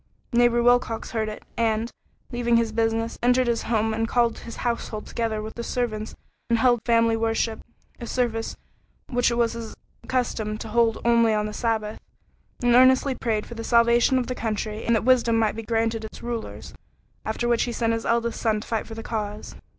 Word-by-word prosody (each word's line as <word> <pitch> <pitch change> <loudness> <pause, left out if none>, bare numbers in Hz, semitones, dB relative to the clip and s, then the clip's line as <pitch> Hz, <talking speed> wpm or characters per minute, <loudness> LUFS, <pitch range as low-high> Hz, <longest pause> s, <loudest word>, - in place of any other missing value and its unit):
Neighbor 240 0 +4
Wilcox 245 -2 +2
heard 220 -2 -1
it, 215 - -8
and, 225 0 0 0.4
leaving 240 -1 +2
his 230 -1 +1
business, 225 +1 -1
entered 250 +1 +3
his 235 -1 0
home 220 -1 0
and 225 +1 -1
called 235 -1 +1
his 230 - -9
household 235 -2 -2
together 220 -2 -2
with 220 - -7
the 235 - -6
servants 225 -3 -3 0.3
and 230 - +3
held 240 -1 +3
family 230 -1 +4
worship 225 0 0 0.4
a 235 - -6
service 225 -3 -1 0.5
which 245 -1 +2
it 235 - -1
was 235 -1 +1
his 230 -1 -7 0.3
custom 225 -4 -1
to 220 - -7
hold 230 0 +2
only 230 -2 +4
on 210 0 0
the 210 - -5
Sabbath 220 -2 -2 0.6
and 240 0 +4
earnestly 260 +2 +5
prayed 225 -4 -2
for - - -9
the 230 -1 -6
salvation 235 +2 +4
of 255 - 0
the 255 - -3
country, 215 -2 -3
and 235 - +3
that 220 - 0
wisdom 240 -3 +4
might 220 -2 +1
be 225 - -4
granted 225 0 -1
its 220 - -9
rulers, 235 -1 -5 0.5
after 220 +2 -2
which 235 -1 +2
he 240 - -3
sent 230 0 0
his 225 0 -2
oldest 235 0 0
son 220 -2 +1
to 210 - -10
fight 225 -2 -2
for 225 - -8
the 225 - -7
cause. 210 -2 -4
230 Hz, 195 wpm, -24 LUFS, 220-240 Hz, 0.6 s, earnestly